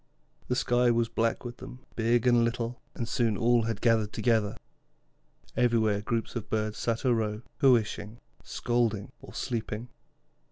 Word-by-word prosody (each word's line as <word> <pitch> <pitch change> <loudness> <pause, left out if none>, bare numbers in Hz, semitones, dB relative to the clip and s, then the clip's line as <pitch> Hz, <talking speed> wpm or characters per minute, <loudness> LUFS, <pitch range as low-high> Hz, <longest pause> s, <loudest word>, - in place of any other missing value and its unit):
The 125 - 0
sky 125 0 +3
was 115 -1 +2
black 115 +2 0
with 120 0 -6
them, 125 +1 -11
big 115 +1 +2
and 120 -1 +5
little, 115 +1 -2
and 115 - -3
soon 115 -3 +1
all 120 0 +4
had 115 -3 -3
gathered 110 -3 +3
together. 110 -4 +1 1.0
Everywhere 110 -4 +2
groups 115 +2 -2
of 110 -3 -4
birds 110 -1 -1
sat 115 -1 -1
a 125 - +4
row, 110 -1 -1 0.2
cooishing, 115 -4 +2 0.2
scolding, 115 -4 -1
or - - -12
sleeping. 115 0 -3
115 Hz, 150 wpm, -29 LUFS, 110-120 Hz, 1.0 s, and